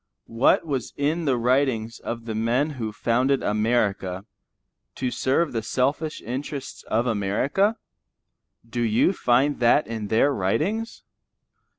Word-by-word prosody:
What 115 +7 +2
was 135 -6 -3
in 155 +4 0
the 135 -4 +2
writings 120 -2 +1
of 115 -1 -6
the 115 - -4
men 120 +7 +1
who 115 -6 -4
founded 125 +5 +1
America, 105 -3 0 0.7
to 125 -1 -2
serve 145 +7 +1
the 115 - -1
selfish 140 +7 -1
interests 135 +4 -5
of 115 +2 +1
America? 125 - +1 0.9
Do 120 +1 -3
you 115 - +3
find 135 -1 +2
that 125 +5 +4
in 110 -2 -5
their 115 +7 +3
writings? 155 - -1
125 Hz, 125 wpm, -24 LUFS, 110-145 Hz, 0.9 s, that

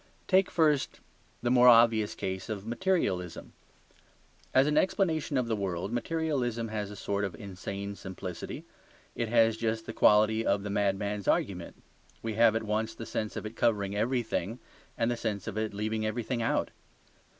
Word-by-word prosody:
Take 190 0 +4
first 150 -4 +1 0.4
the 120 - +1
more 125 0 +6
obvious 115 -3 +6
case 95 +2 -4
of 105 -2 -4
materialism. 115 - -1 1.0
As 130 +1 +5
an 150 0 +1
explanation 160 -4 +1
of 125 - +1
the 115 -1 -1
world, 95 -1 -3
materialism 120 -4 -1
has 105 -2 -3
a 105 - -8
sort 100 +1 -2
of 95 -5 -3
insane 100 +2 -6
simplicity. 95 -1 -7 0.5
It 115 -2 -2
has 115 -1 +4
just 110 0 -2
the 115 - -6
quality 110 +1 +4
of 100 -2 +1
the 105 - -4
madman's 100 0 -1
argument; - - -1 0.4
we 115 -1 -2
have 115 0 +4
at 115 - 0
once 110 +1 -1
the 115 - -7
sense 110 -1 -3
of - - -5
it 110 +1 -6
covering 100 -4 +1
everything 115 -2 -1 0.4
and 115 +1 +1
the - - 0
sense 105 -5 -3
of - - -5
it 110 0 -1
leaving 110 +2 -2
everything 115 +2 -2
out. 115 - 0
110 Hz, 165 wpm, -29 LUFS, 100-120 Hz, 1.0 s, more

